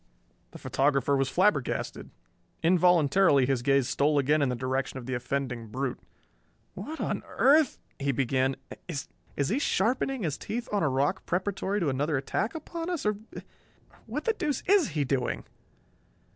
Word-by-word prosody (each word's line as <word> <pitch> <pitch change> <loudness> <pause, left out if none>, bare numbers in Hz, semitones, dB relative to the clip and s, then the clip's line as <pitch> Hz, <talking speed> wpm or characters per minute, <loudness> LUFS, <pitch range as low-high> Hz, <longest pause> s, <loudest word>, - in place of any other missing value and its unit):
The - - -11
photographer 140 0 +1
was 135 -1 +1
flabbergasted. 160 - 0 0.5
Involuntarily 170 -3 +4
his 135 -2 0
gaze 135 0 +3
stole 145 +3 +2
again 145 +2 +3
in 140 - +2
the 125 - -1
direction 130 +2 -2
of 125 - -7
the 130 - -3
offending 125 -2 -3
brute. 130 +4 -3 0.7
"What 315 +1 -7
on - - -2
earth 290 0 +4
" - - -39
he 140 0 +1
began. 130 +1 +1 0.3
"Is 145 -4 -4 0.4
he 235 +8 +1
sharpening 250 +1 0
his 155 -5 -2
teeth 235 +2 -4
on 205 - +1
a 155 - +2
rock 140 +8 0
preparatory 195 +2 -1
to 160 - +1
another 145 +3 0
attack 205 - -2
upon 330 +2 -5
us? 350 -9 -3
Or 210 -1 +1 0.9
What 270 +7 -4
the 455 - +3
deuce 300 -9 -2
is 400 -2 +4
he 145 - +3
doing?" 130 -2 -1
145 Hz, 160 wpm, -28 LUFS, 135-210 Hz, 0.9 s, Involuntarily